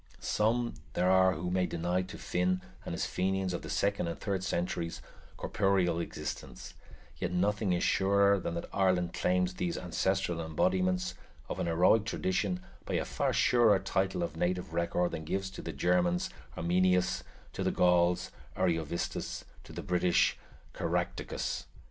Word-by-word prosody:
Some 115 +3 +1 0.2
there 90 +1 +2
are 95 0 +5
who 90 +2 -3
may 90 0 +2
deny 90 +2 0
to 95 - -8
Finn 90 +1 0 0.2
and - - -5
his - - -1
Fenians 95 0 -1
of 85 - -3
the - - -8
second 100 -3 0
and 85 - -4
third 95 -2 -2
centuries 85 -2 -2 0.4
corporeal 95 -4 +1
existence; 65 -6 -6 0.4
yet 90 - -2
nothing 100 +2 +1
is 90 -1 +1
surer 100 +1 +4
than 85 -2 -3
that 85 - -4
Ireland 90 -3 +2
claims 90 0 +1
these 90 -2 -2
ancestral 90 0 0
embodiments 185 - +1 0.3
of - - -4
an - - 0
heroic 90 +6 +4
tradition 95 -2 -1 0.2
by - - -3
a - - 0
far - - 0
surer 115 -5 +5
title 95 -1 0
of 80 -3 -4
native 90 0 -1
record 85 +1 +1
than 80 -1 -4
gives 95 +4 -2
to 95 - -8
the 85 - -5
Germans 90 +3 +1 0.3
Arminius, 90 +1 +2 0.3
to - - -3
the - - +2
Gauls, 90 0 +3 0.3
Ariovistus, 80 0 -1 0.2
to - - -12
the - - -6
British, 90 -1 +3 0.4
Caractacus. - - -2
90 Hz, 155 wpm, -31 LUFS, 85-95 Hz, 0.4 s, are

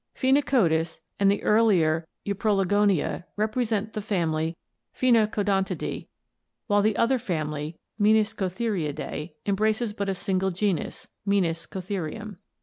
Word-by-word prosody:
Phenacodus 245 - +2 0.2
and 200 -1 +5
the 200 - +1
ear 215 +2 +4
lier 165 -7 +3 0.2
Euprologonia 200 -3 +1
represent 220 0 0
the 215 - -3
family 165 -5 -1 0.4
Phenacodontidae, 210 -5 +1 0.6
while 205 -2 +3
the 215 0 +1
other 245 +3 +3
family, 155 -6 -3 0.2
Meniscotheriidae, 205 -7 0
embraces 215 +2 +1
but 200 -2 -2
a 195 - 0
single 190 +1 0
known 180 - -6
genus, 205 - -1 0.2
Meniscotherium. 190 +2 -2
200 Hz, 105 wpm, -26 LUFS, 170-215 Hz, 0.6 s, and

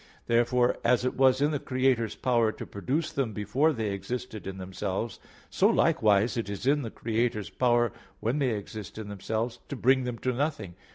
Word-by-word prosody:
Therefore 120 +1 +2
as 125 +1 +3
it 130 - 0
was 130 0 +4
in 145 +1 +3
the 145 - -1
Creator's 130 -4 +1
power 120 -4 +2
to - - -8
produce 135 - -2
them 130 -6 -1
before 110 +10 +1
they 110 -7 -2
existed 110 +2 -5
in 95 0 -5
themselves, 95 +4 -4 0.3
so - - +4
likewise 105 +2 +3
it 110 -3 -2
is 100 +3 -5
in 145 +2 +3
the 115 - -4
Creator's 110 -2 -1
power 120 -1 +2 0.3
when 120 +7 0
they 135 -3 +2
exist 105 +1 -8
in 110 -2 -6
themselves 110 +4 -3
to - - -3
bring 130 +1 +3
them 120 -1 -3
to 130 +2 -1
nothing. 125 - -2
120 Hz, 185 wpm, -28 LUFS, 105-130 Hz, 0.3 s, was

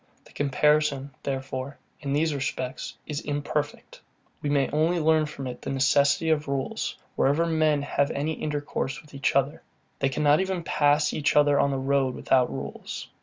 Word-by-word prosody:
The - - -18
comparison, 145 -1 +2
therefore, 135 0 -4 0.2
in 140 - -4
these 155 +2 +1
respects, 135 -1 -4
is 150 -1 -4
very 145 -1 -2
imperfect. 145 +1 -4 0.4
We 145 - -2
may 140 -2 +2
only 160 +4 +2
learn 155 -1 +3
from 140 -3 -7
it 125 -1 -6
the - - -5
necessity 140 +4 +3
of 150 -1 +1
rules, 140 -1 -2 0.2
wherever 145 +5 +2
men 155 -3 +2
have 140 0 +1
any 150 +3 -1
intercourse 145 -2 -3
with 150 -1 -18
each 140 0 0
other. 140 +1 +1 0.4
They 135 - +2
cannot 150 +2 +3
even 190 -2 -2
pass 145 -1 +2
each 150 -1 0
other 145 -1 +5
on 140 - +3
the 135 - -1
road 135 -1 +1
without 130 -2 +2
rules. - - -6
145 Hz, 170 wpm, -26 LUFS, 135-150 Hz, 0.4 s, other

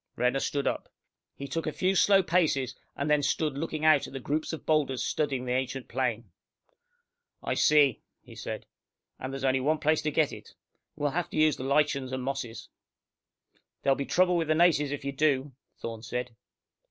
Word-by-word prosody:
Renner 125 +2 +1
stood 140 0 -1
up. - - -2 0.5
He 140 - -7
took 165 +4 -3
a - - 0
few 185 +4 +1
slow 195 +2 +5
paces, 150 -8 +1 0.2
and 140 - -2
then 150 -1 +3
stood 145 0 0
looking 155 +1 -3
out 155 -3 +5
at - - -12
the 135 - -4
groups 150 +4 -2
of 160 - -7
boulders 145 -5 +1
studding 140 -4 -1
the 125 - -2
ancient 130 0 -2
plain. 120 -2 -2 1.1
"I - - -1
see," 145 -5 +4 0.2
he - - -14
said. - - -6 0.5
"And 130 - -5
there's 135 0 -6
only 130 0 +2
one 150 +4 +1
place 155 +1 +2
to 155 - -1
get 155 0 +2
it. - - -12 0.4
We'll 145 -1 -1
have 175 +2 -2
to - - -6
use 155 -1 +4
the - - -6
lichens 140 -2 +1
and 130 0 -3
the - - -6
mosses." 135 -4 -4 1.2
"There'll 135 - +4
be 140 - -3
trouble 180 +2 +3
with 165 -2 0
the 155 - +2
natives 155 -4 +4
if 145 0 -5
you 140 - -1
do," 140 -1 +1 0.3
Thorne 115 -1 -6
said. 125 +1 -4
140 Hz, 195 wpm, -28 LUFS, 130-155 Hz, 1.2 s, slow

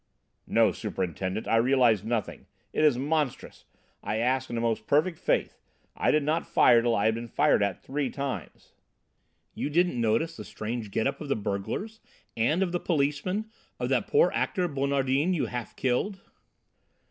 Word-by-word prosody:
"No, - - +4
Superintendent, 95 +3 -3
I 115 - +3
realised 120 -4 +3
nothing. 115 -1 -3 0.3
It - - +1
is 150 -5 +4
monstrous! 145 0 -2 0.4
I 105 +2 -2
asked 130 +3 0
in 120 - -4
the - - -1
most 115 -2 -1
perfect 160 +4 +2
good - - -29
faith. - - 0 0.4
I - - +1
did 150 -1 +3
not 155 +3 0
fire 120 -1 +5
till 120 -1 +1
I 100 - +1
had 110 - +4
been 115 +1 -5
fired 110 - +2
at 100 -3 -1
three 140 -1 -2
times." 135 - -6 0.8
"You - - -3
didn't 170 -5 +1
notice 135 +9 +1
the 105 - -7
strange 110 +1 -5
get 110 - -1
up 140 +2 -2
of 150 - -5
the - - +2
burglars? 105 - -4 0.4
And 150 +11 +2
of 180 - -2
the 175 - -1
policemen? 170 +8 -1 0.3
Of - - -2
that - - +1
poor 460 +3 +4
actor, 180 -4 0
Bonardin, 140 +3 +1
you 160 - 0
half 120 -2 -6
killed?" 135 +11 -1
130 Hz, 175 wpm, -27 LUFS, 115-155 Hz, 0.8 s, fire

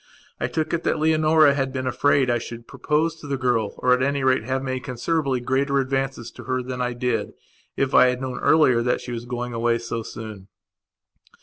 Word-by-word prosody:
I - - 0
took 155 0 -2
it 170 - 0
that - - +1
Leonora 155 -1 +4
had 135 -2 -1
been 130 0 -3
afraid 135 -1 +2
I 120 - +1
should 115 0 -9
propose 160 +2 -1
to 145 - -10
the 140 -1 -1
girl 120 -5 0
or, 125 0 +3
at 125 - +1
any 140 0 0
rate, 130 0 +3
have 130 +1 -2
made 130 -1 -3
considerably 135 +2 -1
greater 135 +3 0
advances 135 -2 -2
to - - -12
her 130 0 -1
than 125 0 -5
I 125 0 -1
did, 120 -3 -2 0.4
if 135 0 0
I 125 - +7
had 125 0 0
known 130 -1 -4
earlier 130 -7 +4
that 125 +1 0
she 125 - -8
was 120 0 -5
going 120 0 -4
away 115 0 +1
so 115 0 -4
soon. 110 -3 -9
130 Hz, 210 wpm, -23 LUFS, 120-140 Hz, 0.4 s, I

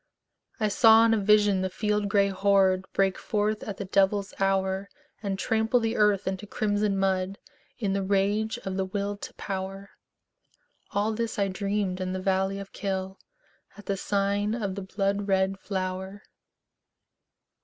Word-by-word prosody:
I 215 - +2
saw 225 +2 +6
in 225 - +4
a - - +3
vision 205 -1 +4
the 190 - -1
field 210 +1 -1
gray 200 0 +3
horde 190 -1 +3
Break 195 -1 +1
forth 210 0 -1
at 200 -2 -6
the 200 - -4
devil's 195 +1 +1
hour, 195 0 0 0.3
And 200 -3 -2
trample 225 +4 +1
the 225 0 -1
earth 210 -2 +3
into 190 +2 -3
crimson 205 -1 0
mud 190 0 0 0.4
In 205 -5 -1
the 200 - 0
rage 205 +4 +1
of 190 0 -3
the 190 - 0
Will 200 +1 -3
to - - -8
Power, 195 0 -5 1.0
All 205 +2 0
this 230 0 -3
I 200 -1 +1
dreamed 195 -1 -2
in 185 0 -2
the 185 - -2
valley 190 +1 0
of 195 0 -9
Kyll, 190 -1 -3 0.6
At 205 - -12
the 200 - -1
sign 200 +2 0
of 205 -5 -2
the 200 - -5
blood 200 +1 -1
red 190 0 +1
flower. 190 +1 -4
200 Hz, 160 wpm, -27 LUFS, 190-210 Hz, 1.0 s, saw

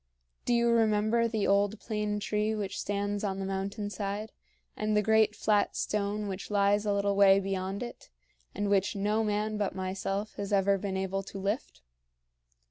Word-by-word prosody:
Do 240 - +2
you 235 0 +3
remember 225 0 +3
the 220 -3 -1
old 200 +2 +2
plane 210 -2 -2
tree 210 +1 0
which 205 -2 -4
stands 205 0 -2
on 195 -2 -1
the 195 - -3
mountain 195 +2 -3
side, 205 +1 -4 0.4
and 215 0 0
the 210 - +3
great 220 0 +3
flat 210 -1 +1
stone 210 0 -1
which 195 0 -5
lies 205 0 +2
a 205 - +2
little 200 0 +1
way 195 -1 +6
beyond 195 +2 -3
it, 240 - -9 0.5
and 205 +1 -1
which 200 0 +2
no 210 +2 +1
man 210 0 -1
but 205 -3 -1
myself 195 +2 -3
has 200 0 -4
ever 200 0 +3
been 190 -1 -3
able 190 0 -1
to 195 - -9
lift? 195 - -3
205 Hz, 175 wpm, -30 LUFS, 195-215 Hz, 0.5 s, way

